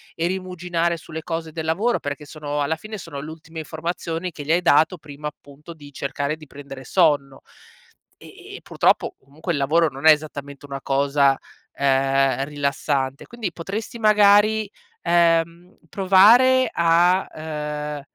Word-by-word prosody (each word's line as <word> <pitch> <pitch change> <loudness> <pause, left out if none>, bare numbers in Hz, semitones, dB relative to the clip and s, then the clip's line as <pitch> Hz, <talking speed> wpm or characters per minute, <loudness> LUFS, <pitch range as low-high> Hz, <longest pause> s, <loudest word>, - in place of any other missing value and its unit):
e 165 - -1
rimuginare 180 -2 -2
sulle 160 0 -8
cose 165 -1 -5
del 160 0 -5
lavoro, 205 +10 +1
perché 145 +1 -5
sono 145 -1 -4
alla 160 +3 -1
fine 215 +5 -8
sono 165 -6 -8
l'ultime 160 +2 -9
informazioni 165 +2 -4
che 150 - -8
gli 145 - -2
hai 175 +2 +2
dato 160 +2 +4
prima, 150 -1 -8
appunto, 150 +2 -11
di 145 -2 -14
cercare 140 +2 -3
di 155 -1 -15
prendere 135 -1 -10
sonno. 145 -3 +1 0.8
Ehm, - - -13
e - - -11
purtroppo - - +1
comunque 150 +6 -6
il 145 - -2
lavoro 160 +4 +2
non 135 +4 -1
è - - +11
esattamente 145 -2 -3
una 140 -1 -7
cosa, 140 0 +2 0.4
ehm, 135 0 +2
rilassante, 140 -1 -2
quindi 230 -6 -5
potresti 210 +7 -6
magari, 215 0 +4 0.4
ehm, 170 +1 +1
provare 225 - +5
a 170 +3 +3
uhm, 150 -1 -5
160 Hz, 145 wpm, -22 LUFS, 145-175 Hz, 0.8 s, è